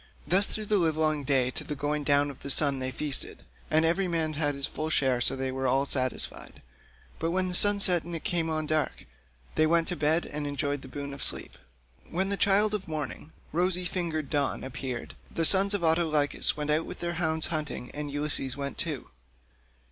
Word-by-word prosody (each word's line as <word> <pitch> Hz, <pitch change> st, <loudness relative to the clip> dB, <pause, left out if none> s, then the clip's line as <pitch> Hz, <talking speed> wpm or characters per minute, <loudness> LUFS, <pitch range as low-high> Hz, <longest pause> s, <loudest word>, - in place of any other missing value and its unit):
Thus 185 Hz, +6 st, +3 dB
through 215 Hz, -, -4 dB
the 210 Hz, -1 st, +2 dB
livelong 155 Hz, -3 st, +1 dB
day 130 Hz, -2 st, +2 dB
to -, -, -5 dB
the 150 Hz, -, -5 dB
going 145 Hz, +1 st, -2 dB
down 145 Hz, 0 st, +2 dB
of 135 Hz, -, -15 dB
the 140 Hz, -, -7 dB
sun 140 Hz, -1 st, +5 dB
they 130 Hz, 0 st, -2 dB
feasted, 140 Hz, 0 st, -2 dB, 0.3 s
and 160 Hz, +1 st, +3 dB
every 180 Hz, +4 st, +1 dB
man 165 Hz, -2 st, -1 dB
had 145 Hz, -1 st, -1 dB
his 140 Hz, 0 st, -1 dB
full 155 Hz, +3 st, -4 dB
share 130 Hz, -5 st, +1 dB
so -, -, +3 dB
that 130 Hz, 0 st, -3 dB
all 130 Hz, 0 st, +1 dB
were -, -, -1 dB
satisfied; 130 Hz, -2 st, -2 dB, 0.6 s
but 165 Hz, -, -1 dB
when 185 Hz, +1 st, 0 dB
the -, -, -4 dB
sun 205 Hz, +3 st, +5 dB
set 180 Hz, -4 st, +5 dB
and 170 Hz, +1 st, -7 dB
it 165 Hz, -, -6 dB
came 170 Hz, -5 st, 0 dB
on 155 Hz, -1 st, -1 dB
dark, 155 Hz, 0 st, -1 dB, 0.5 s
they 155 Hz, -, +3 dB
went 165 Hz, 0 st, +2 dB
to 180 Hz, -, -1 dB
bed 160 Hz, +2 st, +2 dB
and 145 Hz, 0 st, -4 dB
enjoyed 145 Hz, 0 st, -2 dB
the -, -, -10 dB
boon 140 Hz, -1 st, -6 dB
of 140 Hz, -, -8 dB
sleep. -, -, -3 dB, 0.5 s
When 190 Hz, +4 st, -1 dB
the 200 Hz, -, +1 dB
child 205 Hz, +2 st, +3 dB
of 210 Hz, -2 st, -3 dB
morning, 155 Hz, 0 st, -5 dB, 0.2 s
rosy 180 Hz, +2 st, +2 dB
fingered 165 Hz, -5 st, -3 dB
Dawn, 145 Hz, -3 st, 0 dB
appeared, 130 Hz, -2 st, -6 dB, 0.2 s
the 165 Hz, -, -1 dB
sons 195 Hz, +3 st, +5 dB
of 190 Hz, -, -3 dB
Autolycus 160 Hz, -4 st, +2 dB
went 150 Hz, 0 st, -2 dB
out 155 Hz, +2 st, 0 dB
with -, -, -8 dB
their 170 Hz, 0 st, -3 dB
hounds 160 Hz, -1 st, +1 dB
hunting, 150 Hz, -5 st, -4 dB
and 150 Hz, 0 st, -5 dB
Ulysses 145 Hz, -2 st, 0 dB
went 140 Hz, 0 st, -5 dB
too. 155 Hz, -6 st, 0 dB
155 Hz, 210 wpm, -28 LUFS, 140-170 Hz, 0.6 s, sun